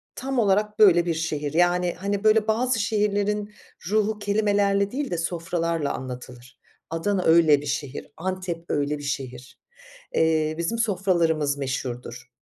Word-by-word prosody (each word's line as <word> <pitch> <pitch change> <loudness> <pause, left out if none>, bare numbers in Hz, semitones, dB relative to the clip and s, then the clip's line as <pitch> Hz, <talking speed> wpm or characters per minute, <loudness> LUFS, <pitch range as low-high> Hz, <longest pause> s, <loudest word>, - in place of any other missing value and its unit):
tam 265 -1 -2
olarak 210 0 +1
böyle 175 -5 +6
bir 170 - 0
şehir. 155 -2 -3
Yani, 175 +1 +2
hani, 200 +2 -2
böyle 215 0 +4
bazı 235 +2 +1
şehirlerin 210 0 0 0.4
ruhu 215 0 +1
kelimelerle 205 -1 +1
değil 280 +2 -3
de 175 - -1
sofralarla 165 -2 -2
anlatılır. 125 -1 -9 0.3
Adana 185 +4 -1
öyle 160 -3 +5
bir - - -9
şehir, 140 0 -4
Antep 180 -1 -4
öyle 145 +1 0
bir 145 - -10
şehir. 130 -3 -6 0.5
Eee, 155 -1 +2
bizim 170 +7 -2
sofralarımız 175 -9 +1
meşhurdur. 125 -2 -5
175 Hz, 135 wpm, -24 LUFS, 150-205 Hz, 0.5 s, böyle